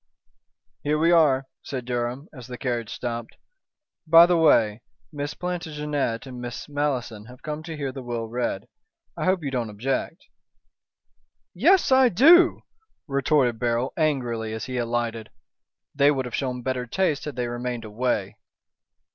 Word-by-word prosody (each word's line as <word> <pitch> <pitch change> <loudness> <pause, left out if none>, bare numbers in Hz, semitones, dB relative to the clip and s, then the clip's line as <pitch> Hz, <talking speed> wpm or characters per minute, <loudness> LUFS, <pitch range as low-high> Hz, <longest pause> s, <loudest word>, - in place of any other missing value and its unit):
"Here 150 +1 0
we 165 +2 +3
are," 145 -6 +4 0.2
said 130 -3 -6
Durham, 125 +4 -3
as 125 -4 -11
the 125 -1 -7
carriage 120 -3 -3
stopped. 120 -2 -5 0.7
"By 165 +1 +9
the 175 0 +2
way, 115 -9 +3 0.3
Miss 145 0 -4
Plantagenet 150 -8 -3
and 125 -2 -8
Miss 120 -1 -6
Malleson 135 -7 -2
have 125 0 -14
come 150 0 -4
to 160 -1 -7
hear 140 -2 -3
the 135 0 -8
will 120 -2 -4
read. 120 -4 -3 0.5
I - - -3
hope 185 -2 +1
you 140 - -3
don't 120 -4 -2
object." 120 +6 -3 1.3
"Yes, 335 - +4
I 260 -1 +6
do," 335 - +6 0.4
retorted 135 -4 +1
Beryl, 120 +1 0
angrily, 120 -8 -1
as 110 - -5
he 130 -1 -4
alighted. 115 -2 -2 0.6
"They 140 0 +4
would 135 -3 0
have 125 - -7
shown 125 -2 -3
better 125 -1 -2
taste 155 +1 0
had 150 - -5
they 125 -1 -2
remained 120 -1 -4
away." 110 -2 -2
130 Hz, 150 wpm, -24 LUFS, 120-150 Hz, 1.3 s, By